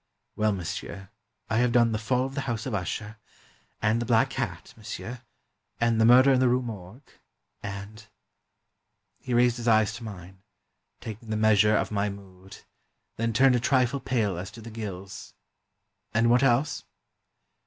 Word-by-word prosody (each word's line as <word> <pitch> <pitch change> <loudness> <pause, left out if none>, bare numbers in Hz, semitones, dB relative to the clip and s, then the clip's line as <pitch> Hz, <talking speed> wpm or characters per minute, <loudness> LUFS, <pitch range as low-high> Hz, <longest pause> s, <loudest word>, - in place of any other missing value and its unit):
"Well, 110 0 +2
monsieur, 95 +1 -5 0.4
I 110 - 0
have 120 0 +3
done 120 -1 +4
'The 110 - -1
Fall 125 +3 0
of 135 - -6
the 135 -2 -3
House 115 -2 -3
of 130 - -4
Usher,'... 105 +3 -4 0.7
and 110 +2 +2
'The 120 - -4
Black 115 -2 +3
Cat,' - - -4
monsieur,... 120 +1 -7 0.6
and 115 -1 +2
'The - - +5
Murder 130 +3 +7
in 130 - +3
the 130 -1 +4
Rue 125 +1 +1
Morgue,'... 110 +2 -9 0.5
and 100 +2 -8 0.3
— - - -53
" - - -49
He 125 -2 -2
raised 120 0 +3
his 120 0 -5
eyes 110 -2 +4
to 115 - -11
mine, 95 -3 -10 0.6
taking 115 -1 -8
the 110 - -1
measure 110 0 +4
of - - -2
my 105 0 0
mood, 95 -1 -12 0.5
then 115 +1 0
turned 130 +3 +4
a - - +2
trifle 130 +2 +2
pale 105 -10 -1
as 95 +2 -6
to 115 - -12
the 115 +1 -9
gills. 100 -4 -8 0.8
"And 115 +1 +4
what 120 +1 +4
else?" 135 +2 +2
115 Hz, 175 wpm, -27 LUFS, 105-120 Hz, 0.8 s, Murder